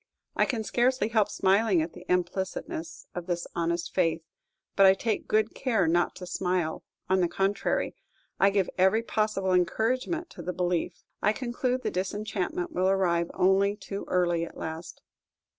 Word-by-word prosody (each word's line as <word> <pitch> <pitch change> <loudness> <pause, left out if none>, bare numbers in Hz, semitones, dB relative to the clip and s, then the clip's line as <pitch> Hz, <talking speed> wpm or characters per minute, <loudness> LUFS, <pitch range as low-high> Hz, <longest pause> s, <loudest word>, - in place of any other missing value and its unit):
I - - +3
can 230 -4 -2
scarcely 245 +1 +1
help 220 -3 +2
smiling 195 0 +3
at 165 - -6
the 180 - -13
implicitness 180 -2 -2
of 175 0 -6
this 175 -1 -2
honest 170 0 -1
faith; 165 -3 +1 0.5
but 195 -1 +7
I 190 - +7
take 220 +2 -2
good 215 +1 +2
care 220 -9 +1
not 175 +1 +2
to 180 - -8
smile; 180 -2 -1 0.2
on 190 0 +3
the 175 - +3
contrary, 195 +3 0 0.5
I 195 - +6
give 195 -2 +1
every 190 +5 +4
possible 210 -4 0
encouragement 255 - 0
to - - -9
the 180 +2 -3
belief. 175 -1 -1 0.2
I 210 - +3
conclude 250 +1 -2
the - - -1
disenchantment 190 -1 -2
will 185 +1 +1
arrive 170 -3 +2
only 195 +2 +3
too 200 -1 -6
early 175 -2 +1
at - - -8
last. 160 +1 -7
190 Hz, 160 wpm, -28 LUFS, 175-215 Hz, 0.5 s, but